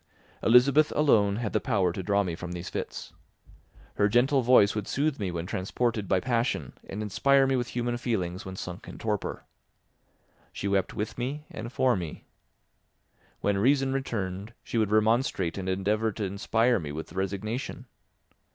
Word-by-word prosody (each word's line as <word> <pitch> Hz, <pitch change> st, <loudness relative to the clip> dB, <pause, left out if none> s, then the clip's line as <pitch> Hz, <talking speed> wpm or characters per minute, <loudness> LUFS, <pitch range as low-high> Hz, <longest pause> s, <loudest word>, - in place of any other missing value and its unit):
Elizabeth 140 Hz, +6 st, +5 dB
alone 105 Hz, -9 st, +4 dB
had 110 Hz, -1 st, -3 dB
the -, -, +3 dB
power 100 Hz, -9 st, +1 dB
to 95 Hz, -, -4 dB
draw 100 Hz, +1 st, +2 dB
me 90 Hz, -3 st, -3 dB
from 90 Hz, +1 st, -6 dB
these 90 Hz, 0 st, -6 dB
fits; -, -, -5 dB, 0.8 s
her 100 Hz, -, +3 dB
gentle 130 Hz, +5 st, +3 dB
voice 120 Hz, -4 st, +5 dB
would 105 Hz, -2 st, -3 dB
soothe 145 Hz, -1 st, 0 dB
me 100 Hz, -3 st, -1 dB
when 85 Hz, -1 st, -4 dB
transported 105 Hz, +3 st, -1 dB
by 95 Hz, -, +3 dB
passion 120 Hz, +2 st, -1 dB, 0.2 s
and 105 Hz, +2 st, -4 dB
inspire 135 Hz, +7 st, +3 dB
me 135 Hz, 0 st, +2 dB
with 120 Hz, -1 st, -1 dB
human 120 Hz, 0 st, -2 dB
feelings 95 Hz, -7 st, -2 dB
when 95 Hz, 0 st, -7 dB
sunk 90 Hz, 0 st, -7 dB
in -, -, -9 dB
torpor. 105 Hz, -3 st, -3 dB, 1.1 s
She 100 Hz, -, -4 dB
wept 100 Hz, -2 st, 0 dB
with 105 Hz, +3 st, -4 dB
me 140 Hz, +5 st, -3 dB
and 115 Hz, +2 st, -6 dB
for 125 Hz, -1 st, +2 dB
me. 85 Hz, -5 st, -6 dB, 1.2 s
When 100 Hz, -1 st, +1 dB
reason 135 Hz, +4 st, +3 dB
returned, 105 Hz, -5 st, -3 dB
she 115 Hz, -, -2 dB
would 110 Hz, -2 st, +2 dB
remonstrate 110 Hz, -4 st, +2 dB
and 95 Hz, -1 st, -4 dB
endeavour 105 Hz, +4 st, +1 dB
to 110 Hz, -, -4 dB
inspire 110 Hz, +4 st, +1 dB
me 75 Hz, -4 st, -5 dB
with 80 Hz, +2 st, -7 dB
resignation. 100 Hz, +7 st, -3 dB
105 Hz, 165 wpm, -28 LUFS, 95-125 Hz, 1.2 s, Elizabeth